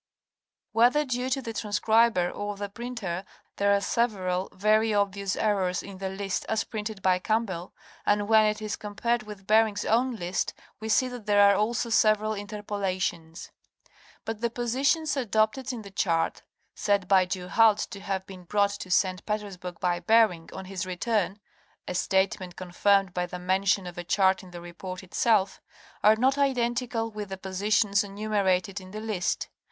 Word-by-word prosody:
Whether 245 +6 +4
due 250 -1 -2
to 265 0 -1
the 230 - -5
transcriber 215 -3 +2
or 205 0 -4
the 205 0 -4
printer 205 -5 -5 0.3
there 200 0 +3
are 200 - +4
several 195 -4 -1
very 215 +2 +2
obvious 200 -1 0
errors 190 -4 0
in 195 -2 -10
the 190 -1 -3
list 195 0 -3
as 220 -1 +1
printed 215 -3 -6
by 185 -1 +3
Campbell, 195 -4 -2 0.3
and 205 0 +1
when 220 -1 +5
it 210 0 -2
is 210 -1 -2
com 210 -1 -8
pared 235 +2 +1
with 210 -2 -10
Bering's 215 0 +3
own 245 +3 +2
list 180 -2 -2 0.2
we 220 0 -5
see 255 +4 +3
that 245 -4 -9
there 205 -1 +6
are 200 - +5
also 230 +3 0
several 215 0 +3
interpo 205 0 -6
lations. 170 -3 -3 0.7
But 225 -1 -4
the 235 - +1
positions 270 +7 0
adopted 225 +1 0
in 235 -3 -6
the 200 - -11
chart, 165 -4 0 0.3
said 205 -3 0
by 190 -1 +5
Du 180 0 -4
Halde 220 0 +4
to 200 - -7
have 195 -1 -3
been 185 -2 -11
brought 200 +2 +2
to 200 -2 -7
St. 185 0 +1
Petersburg 195 -5 -4
by 175 -1 0
Bering 180 -3 +3
on 190 - -7
his 190 0 -4
return 195 +2 -1 0.5
(a - - -3
statement 185 -1 0
con 185 -1 -8
firmed 195 0 +3
by 180 0 -1
the 180 - -6
mention 190 +2 +1
of 175 -1 -7
a - - -4
chart 190 +1 +2
in 185 - -13
the 175 -1 -9
report 185 +2 -8
itself), 200 +1 +1 0.4
are 215 +1 +7
not 265 +5 +2
identical 240 -3 0
with 210 -2 -6
the 190 - -5
positions 200 +2 +1
enumerated 200 -2 -1
in 185 - -12
the 210 +3 -6
list. 215 -5 -2
205 Hz, 175 wpm, -27 LUFS, 185-220 Hz, 0.7 s, are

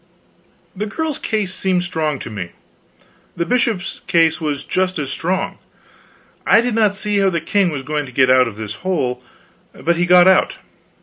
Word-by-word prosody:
The 210 +3 -3
girl's 310 +6 -3
case 205 -4 -2
seemed 185 -2 0
strong 160 -4 -2
to - - -7
me; 90 -5 -6 0.8
the 170 - 0
bishop's 225 -5 -1
case 165 -1 +2
was 150 -3 -2
just 185 0 -1
as 140 -2 -3
strong. 185 +5 -2 0.8
I - - +5
did 240 0 0
not 215 -2 +2
see 205 0 -1
how 195 -1 +3
the 170 -2 -1
king 190 +3 +1
was 145 -4 -5
going 150 0 -3
to - - -11
get 130 +1 +3
out 130 -1 +5
of 110 - -7
this 110 -1 -6
hole. 165 -10 -1 0.5
But 170 0 -1
he 175 0 +1
got 180 0 +7
out. 190 0 +3
180 Hz, 180 wpm, -19 LUFS, 150-195 Hz, 0.8 s, got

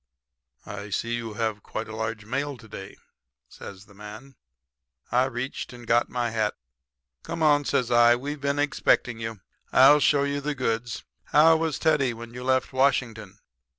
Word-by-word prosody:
"'I 100 - -7
see 115 +4 -2
you 115 -2 -4
have 110 -2 -2
quite 110 - -6
a 110 - -8
large 110 -1 -4
mail 140 +4 -3
to 115 - -15
day,' 100 -2 -9 0.5
says 100 0 -11
the 100 - -19
man. 105 +6 -11 0.8
"I 125 +2 +3
reached 130 0 -5
and 120 -1 -11
got 120 +1 +2
my 120 -2 -2
hat. 110 -2 -1 0.7
"'Come 165 -1 -4
on,' 145 -1 +4
says 130 -4 0
I. 120 0 +6
'We've 140 +3 -5
been 140 0 0
expecting 140 -4 +1
you. 110 -3 -6 0.3
I'll 140 +3 +7
show 145 -1 +3
you 140 0 -2
the 145 +1 -3
goods. 115 -3 -2 0.2
How 160 +2 +5
was 160 -2 -1
Teddy 140 -6 +1
when 115 +1 -10
you 125 +1 -7
left 130 +1 0
Washington?' 115 -7 0
120 Hz, 170 wpm, -25 LUFS, 110-140 Hz, 0.8 s, I'll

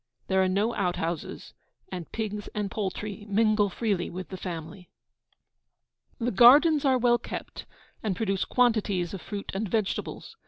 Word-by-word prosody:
There 190 0 +3
are 190 - +3
no 205 +5 +1
out 180 -3 0
houses, 165 -1 -4 0.4
and 180 -3 -6
pigs 210 -2 -4
and 205 -2 -2
poultry 205 0 -4
mingle 210 0 +3
freely 200 -2 -1
with 185 +1 -7
the 190 - -6
family. 180 0 -7 1.3
The 245 +1 -1
gardens 285 - +7
are 265 -2 +4
well 240 -1 +3
kept, - - -7 0.3
and 205 -4 -1
produce 195 -2 0
quantities 210 -8 +1
of 190 - -6
fruit 200 +3 -6
and 200 +1 -2
vegetables. 220 - -3
205 Hz, 150 wpm, -27 LUFS, 185-225 Hz, 1.3 s, gardens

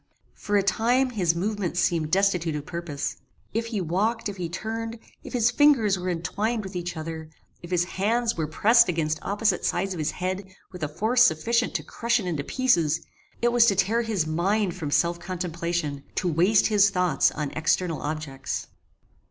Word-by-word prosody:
For 205 0 -1
a 200 - +2
time 245 +6 +2
his 180 -7 +1
movements 190 -1 -2
seemed 165 -4 +1
destitute 180 -3 +1
of 150 -1 -5
purpose. 170 -4 -4 0.4
If 230 +2 -1
he 220 -4 -2
walked; 210 +8 0
if 200 - -7
he 175 -2 -3
turned; 225 +5 -4 0.3
if - - -9
his 245 -1 +3
fingers 245 -7 +4
were 180 +1 -3
entwined 210 +6 -2
with 190 -1 -8
each 175 -1 -4
other; 160 0 -6 0.3
if 175 - -10
his 180 -1 +2
hands 225 +6 0
were 160 -2 -2
pressed 225 +8 +4
against 155 -2 -1
opposite 205 +2 0
sides 190 +2 0
of 175 - -6
his 155 0 0
head 185 +2 -4 0.2
with 180 -2 -10
a 155 - 0
force 220 +11 +1
sufficient 235 +5 +2
to - - -1
crush 235 +1 0
it 200 - -5
into 160 -5 -2
pieces; 170 - +1 0.4
it 240 - +4
was 235 -1 +5
to 200 - +3
tear 200 +5 +2
his 215 -8 -1
mind 180 +5 0
from 160 -5 -4
self 170 +3 +1
contemplation; 170 -5 -3
to 185 - 0
waste 180 +6 +3
his 205 -2 +4
thoughts 180 -7 +2
on 150 -2 -4
external 165 +1 0
objects. 145 -3 -4
185 Hz, 185 wpm, -25 LUFS, 165-220 Hz, 0.4 s, was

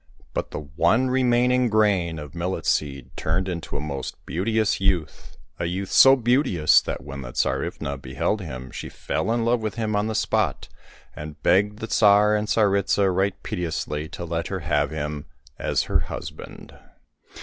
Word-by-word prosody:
But - - -2
the - - -5
one 85 - +1
remaining 125 -1 +3
grain 100 -6 +2
of 75 -2 -8
millet 85 +2 -3
seed 70 -3 -1
turned 90 +4 -1
into 85 -3 -4
a - - -3
most 70 -2 -5
beauteous 110 +3 0
youth, 90 -6 -1 0.2
a 85 - -1
youth 95 +3 -3
so 135 0 +8
beauteous 120 - +3
that - - -5
when 70 -1 -7
the - - -8
Tsarivna 70 +2 -2
beheld 105 +8 -2
him 65 -7 -7
she - - -6
fell - - -2
in 115 0 0
love 120 +1 +2
with 110 -3 -3
him 110 -2 -1
on 105 +1 +1
the 110 - -3
spot, - - 0 0.5
and 75 0 -9
begged 105 +3 +3
the 110 - -5
Tsar 105 -1 +5
and 105 0 -1
Tsaritsa 100 -2 +2
right 95 +1 +1
piteously 80 -5 -3
to 85 -1 -6
let 85 0 -3
her 95 -2 -4
have 75 -1 +1
him 75 -1 -5 0.3
as - - 0
her - - +1
husband. - - -8
95 Hz, 170 wpm, -24 LUFS, 75-110 Hz, 0.5 s, so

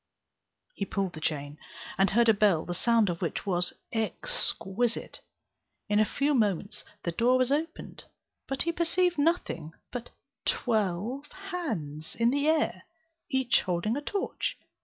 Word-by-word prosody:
He - - -3
pulled 195 -1 -1
the 155 - -7
chain, 145 -1 -2 0.4
and 195 0 +4
heard 235 +4 +4
a 225 - +8
bell 200 -6 +3
the 175 - -3
sound 230 +3 +3
of 170 -2 -2
which 170 - -2
was 180 -2 0 0.2
exquisite. 230 - -1 0.7
In 210 0 +4
a 215 - +5
few 290 +1 +1
moments 205 - +1 0.2
the 170 - -1
door 240 +8 +3
was 255 +1 +2
opened; 315 +3 -2 0.4
but 270 0 0
he 335 - +1
perceived 345 0 +2
nothing 285 - 0 0.2
but 245 -1 -5 0.3
twelve 225 +4 0 0.2
hands 160 - -4
in 235 +1 +3
the 285 +2 +1
air, 315 0 +2 0.5
each 265 -3 +3
holding 180 +5 0
a 290 - -2
torch. 400 +6 -2
230 Hz, 145 wpm, -29 LUFS, 180-280 Hz, 0.7 s, a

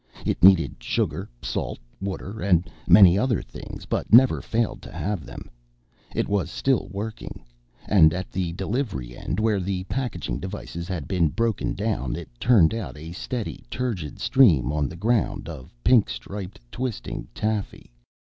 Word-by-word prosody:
It - - -1
needed 95 -3 +6
sugar, - - -1
salt, - - -3 0.2
water 100 +2 -5
and 90 -3 +3 0.2
many 95 0 +8
other 125 -4 +1
things - - -9
but - - -2
never 125 +3 +7
failed 115 0 -1
to - - -11
have 100 -6 -3
them. - - -9 0.7
It - - 0
was 100 -4 0
still 135 +7 0
working. 100 - -6 0.4
And 80 -6 +6
at 95 +3 -4
the 90 -2 -2
delivery 95 - -3
end, - - -3
where 110 -2 +2
the 90 0 -2
packaging 120 - -3
devices 95 -3 -6
had 90 -7 -4
been 90 -4 +2
broken 115 +7 -1
down, 100 - -1
it - - -7
turned 110 -9 +5
out 115 -9 -5
a 80 +2 -8
steady 115 +5 -5
turgid 110 - -3
stream 85 - +4
on 75 -2 0
the - - -9
ground 100 -1 0
of 75 -6 -9
pink 120 -4 +5
striped, 100 -1 -7
twisting 120 - -4
taffy. 105 - -3
100 Hz, 155 wpm, -25 LUFS, 85-110 Hz, 0.7 s, many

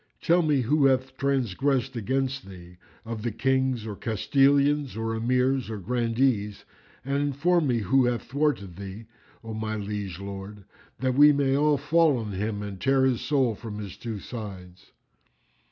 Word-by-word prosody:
Tell 175 +2 +3
me 150 -4 +2
who 140 +4 +2
hath 130 0 0
transgressed 135 -1 0
against 130 +2 -2
thee 90 -1 -12 0.3
of 115 -1 -5
the 120 +1 -2
Kings 130 0 0
or 105 -2 -5
Castellans 140 +5 +2
or 115 0 -2
Emirs 125 +2 +1
or 110 - -4
Grandees, 115 0 0 0.4
and 140 +1 0
inform 150 +4 +1
me 120 -3 +1
who 125 +6 +3
hath 120 -1 -1
thwarted 135 - -1
thee, 100 +3 -8 0.4
O 115 -1 -6
my 110 0 -3
liege 100 -3 -5
lord, 100 +1 -8 0.4
that 130 -1 +1
we 145 +3 +7
may 140 -2 +1
all 150 +1 +3
fall 160 -2 +3
on 110 -3 -4
him 105 +2 -3
and 100 -2 -7
tear 135 0 +3
his 130 -3 +1
soul 135 -6 +1
from 105 -1 -8
his 100 -4 -7
two 115 -3 -6
sides." 95 -5 -9
120 Hz, 160 wpm, -26 LUFS, 105-135 Hz, 0.4 s, we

